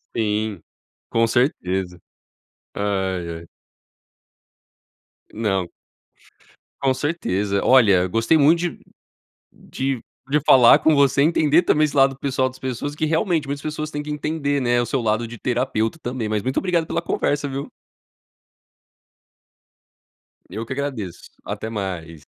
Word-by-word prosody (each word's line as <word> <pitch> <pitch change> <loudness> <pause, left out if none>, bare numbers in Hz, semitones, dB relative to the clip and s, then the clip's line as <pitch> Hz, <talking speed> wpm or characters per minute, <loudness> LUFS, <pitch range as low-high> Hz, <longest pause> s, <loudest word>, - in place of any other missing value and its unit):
Sim, 105 -3 -1 0.5
com 115 0 +2
certeza. 95 - -1 0.8
Ai 95 -3 -2
ai. 85 - -13 1.9
Não. 95 -5 -1 1.1
Com 135 -1 +3
certeza, 105 - -1
olha, 100 -8 +5
gostei 115 - +2
muito 155 +3 +5
de 175 -2 -3 0.7
de 135 -2 -4 0.3
de 150 +2 +3
falar 125 -3 +7
com 160 - +3
você 140 -1 +3
e - - +5
entender 160 0 +3
também 155 -3 +3
esse 150 - -2
lado 135 -1 +4
pessoal 130 -1 0
das 130 0 -14
pessoas 130 +3 -4
que, 155 - -2
realmente, 160 0 0
muitas 140 +1 -4
pessoas 155 +1 -4
tem 145 -1 -4
que 150 - -10
entender, 150 -1 -1
né, 120 -2 +2
o 120 - -1
seu 130 +2 -1
lado 110 +1 0
de 120 - -9
terapeuta 125 +1 -1
também, 120 -3 -3
mas 105 -1 0
muito 130 +4 -3
obrigado 175 -3 +1
pela 170 - -2
conversa, 145 -3 -1
viu? 135 0 -5 2.8
Eu 110 +5 -5
que 125 - -5
agradeço, 130 -10 -5
até 110 - -5
mais. 90 -7 -5
130 Hz, 135 wpm, -22 LUFS, 105-145 Hz, 2.8 s, falar